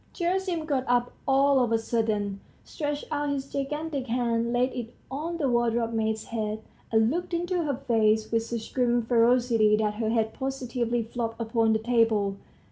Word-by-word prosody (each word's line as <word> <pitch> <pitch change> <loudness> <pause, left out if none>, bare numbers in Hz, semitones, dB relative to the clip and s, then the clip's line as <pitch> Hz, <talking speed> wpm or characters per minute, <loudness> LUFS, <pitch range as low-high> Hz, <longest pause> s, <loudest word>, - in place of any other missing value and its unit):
Gerasim 355 -2 -1
got 275 -4 0
up 245 0 +2 0.2
all 275 0 +4
of 235 - -1
a 225 - +4
sudden, 215 -3 -1 0.2
stretched 290 -2 -4
out 290 -1 -1
his 275 -1 -2
gigantic 285 0 -3
hand, 235 -1 0
laid 250 +2 +1
it 240 -2 -6 0.2
on 320 +5 -3
the 295 -5 0
wardrobe 235 -1 +1
maid's 220 -1 -1
head, 220 -1 -3 0.3
and 220 +1 +4
looked 350 +2 -2
into 350 +1 0
her 285 -3 0
face 220 -4 +1
with 230 0 +2
such 230 0 -6
grim 240 -2 +2
ferocity 230 -2 +3
that 210 -1 0
her 220 - 0
head 220 -1 +1
positively 245 -3 -2
flopped 230 0 -4
upon 225 -1 +2
the - - +3
table. 220 -4 +1
240 Hz, 170 wpm, -27 LUFS, 225-275 Hz, 0.3 s, all